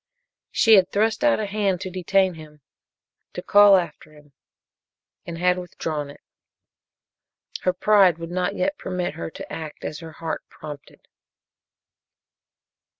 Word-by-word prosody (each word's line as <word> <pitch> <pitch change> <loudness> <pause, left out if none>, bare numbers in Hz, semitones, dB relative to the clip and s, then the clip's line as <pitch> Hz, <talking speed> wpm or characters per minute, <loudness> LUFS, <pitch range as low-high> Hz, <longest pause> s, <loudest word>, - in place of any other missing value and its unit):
She 220 -2 +5
had 185 -1 +3
thrust 220 +5 0
out 295 -5 +3
a 215 - -1
hand 200 -2 -1
to 190 -1 -5
detain 185 +1 +1
him 155 -2 -14 0.7
to - - -6
call 205 -1 +7
after 160 -3 -5
him 150 -2 -20 0.9
and 170 -1 -6
had 180 +1 +2
withdrawn 155 -4 -5
it. 140 - -14 1.4
Her 185 - +1
pride 190 -3 +4
would 165 0 -8
not 185 +2 -1
yet 290 +4 -1
permit 180 -3 -3
her 165 - -6
to - - -10
act 155 -2 -7
as 150 - -5
her 165 -1 -10
heart 165 0 -5
prompted. 145 -2 -11
180 Hz, 140 wpm, -23 LUFS, 160-195 Hz, 1.4 s, call